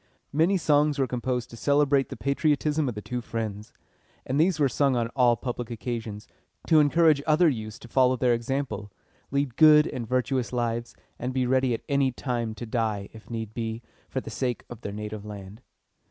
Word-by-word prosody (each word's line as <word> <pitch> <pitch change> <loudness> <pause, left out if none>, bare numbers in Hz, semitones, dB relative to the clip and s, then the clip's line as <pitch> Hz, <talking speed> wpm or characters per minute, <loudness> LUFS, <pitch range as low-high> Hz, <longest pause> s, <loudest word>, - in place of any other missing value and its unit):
Many 165 +6 +3
songs 150 -3 +2
were 135 - +2
composed 125 -1 -3
to - - -9
celebrate 140 +1 +2
the - - -7
patriotism 145 +3 +1
of 120 - -5
the 105 - -6
two 125 -1 -4
friends; 110 -1 -5 0.5
and 135 +3 -1
these 165 0 +3
were 145 - +4
sung 135 +1 +1
on 115 -1 0
all 125 -2 +3
public 120 0 -5
occasions, 115 -3 -5 0.4
to 160 - +5
encourage 150 0 +4
other 160 +3 +5
youths 110 -7 -2
to - - -13
follow 130 +1 +3
their 125 -1 +2
example, 120 -3 -3 0.4
lead 140 -3 -1
good 155 -1 +8
and 120 -3 -4
virtuous 125 0 0
lives, 120 -1 -2 0.2
and 125 +2 -3
be 130 -1 +2
ready 130 -1 +2
at - - -9
any 140 -3 +2
time 120 -3 -3
to 120 - -6
die, 110 -3 -2
if 110 0 -14
need 110 -2 -5
be, 115 0 -4 0.3
for - - -2
the - - -8
sake 125 -3 -2
of 120 -1 -9
their 100 - -5
native 105 0 -6
land. 105 +1 -9
125 Hz, 190 wpm, -26 LUFS, 115-140 Hz, 0.5 s, good